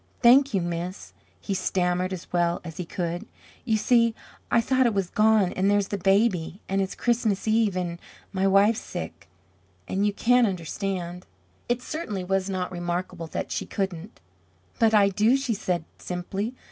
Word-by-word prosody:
"Thank 260 0 +6
you, 190 - +2
miss," 170 - -5 0.3
he 200 - -3
stammered 185 -1 0
as 185 -2 -5
well 175 -1 +2
as 165 -3 -8
he 180 - -4
could. 175 -1 -4 0.4
"You 220 -3 +2
see, 230 +1 +3 0.3
I 235 - +4
thought 260 +2 +3
it 225 - -1
was 195 -3 -1
gone 215 -3 +3
and 190 +2 +1
there's 205 -1 +2
the 205 - -2
baby 195 -2 +2
and 195 +1 0
it's 190 - -3
Christmas 225 -4 0
Eve 215 -3 +2
and 170 -1 -3 0.3
my 190 0 +1
wife's 200 +3 +4
sick - - -7 0.6
and 195 - -1
you 205 - +3
can't 245 +3 +3
understand 180 0 -4 0.2
" 90 - -37
It 240 +1 0
certainly 215 - -4
was 195 +1 0
not 185 -1 -2
remarkable 175 -1 -3
that - - -4
she - - -3
couldn't. 195 0 -4 0.6
"But 225 -1 +4
I 200 -1 +6
do," 215 +6 +3
she 270 -4 -1
said, 180 -5 -2
simply. 195 +6 -4
195 Hz, 170 wpm, -26 LUFS, 180-220 Hz, 0.6 s, Thank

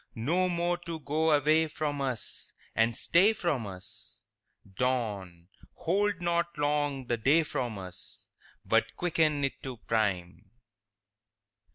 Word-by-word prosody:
No 170 +11 +1
more 175 0 0
to 170 -2 -6
go 155 +2 0
away 155 +2 +4
from 145 -2 -3
us 130 -5 -3 0.2
And 115 +1 +3
stay 185 - +4
from 150 - -1
us?— 95 -1 -10 0.6
Dawn, 100 -9 -2 0.3
hold 200 +2 0
not 170 -1 0
long 145 -2 0
the 120 -1 0
day 145 +9 +4
from 120 -7 -3
us, 90 -2 -10 0.4
But - - +2
quicken 155 -4 +1
it 135 0 -2
to 130 -2 -6
prime! 100 -6 -1
145 Hz, 125 wpm, -30 LUFS, 115-170 Hz, 0.6 s, away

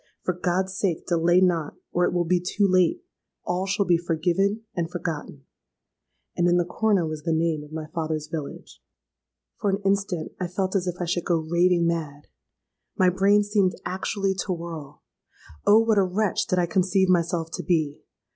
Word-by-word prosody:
For 185 - 0
God's 185 +2 -1
sake, 185 -4 -1
delay 175 +1 +3
not; 170 -5 +1 0.2
or 175 0 +2
it - - 0
will 175 -1 0
be 180 +2 +2
too 195 +3 +1
late! 185 - +2 0.4
All 180 +2 -1
shall 195 +1 +1
be 175 -2 +3
forgiven 175 +5 0
and 170 -2 -1
forgotten._'—And 165 +1 -7
in 175 0 +4
the 175 - +2
corner 200 0 +1
was 155 -1 -5
the 165 - -2
name 160 -1 0
of 150 - -14
my 155 0 -5
father's 155 -2 -2
village! 155 -2 -7 0.8
"For 205 - 0
an 195 - +1
instant 195 -4 0
I 180 - -1
felt 190 +2 -2
as 185 -2 0
if 175 - -2
I 175 - -1
should 175 0 -1
go 170 - +2
raving 175 +1 +3
mad. 155 -4 -2 0.7
My 185 -1 +4
brain 200 +3 +4
seemed 205 -3 +1
actually 195 +1 -1
to 190 - -4
whirl. 165 -4 -8 0.6
Oh! 205 - +8
what 225 -2 +3
a - - +4
wretch 190 +1 0
did 185 - 0
I 175 - +3
conceive 190 +2 +2
myself 170 -2 +1
to - - -4
be! 155 -5 0
175 Hz, 180 wpm, -25 LUFS, 165-190 Hz, 0.8 s, Oh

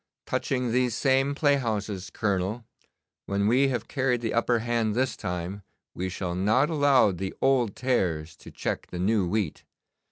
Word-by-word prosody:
Touching 125 -3 -1
these 125 -1 +1
same 135 +1 +2
playhouses, 110 - 0
Colonel, 100 +3 -1 0.6
when 100 0 0
we 130 +5 +4
have 120 -4 -2
carried 130 -3 0
the 115 - -2
upper 120 +1 +2
hand 115 -2 0
this 130 +1 0
time, 90 +1 -4 0.3
we 95 +1 -3
shall 90 -1 -3
not 110 - +2
allow 145 -8 +4
the 95 +1 -5
old 125 -6 +2
tares 85 -11 -1
to - - -12
check - - -4
the 90 - -7
new 95 +1 +1
wheat. 100 -3 -2
115 Hz, 155 wpm, -27 LUFS, 95-130 Hz, 0.6 s, we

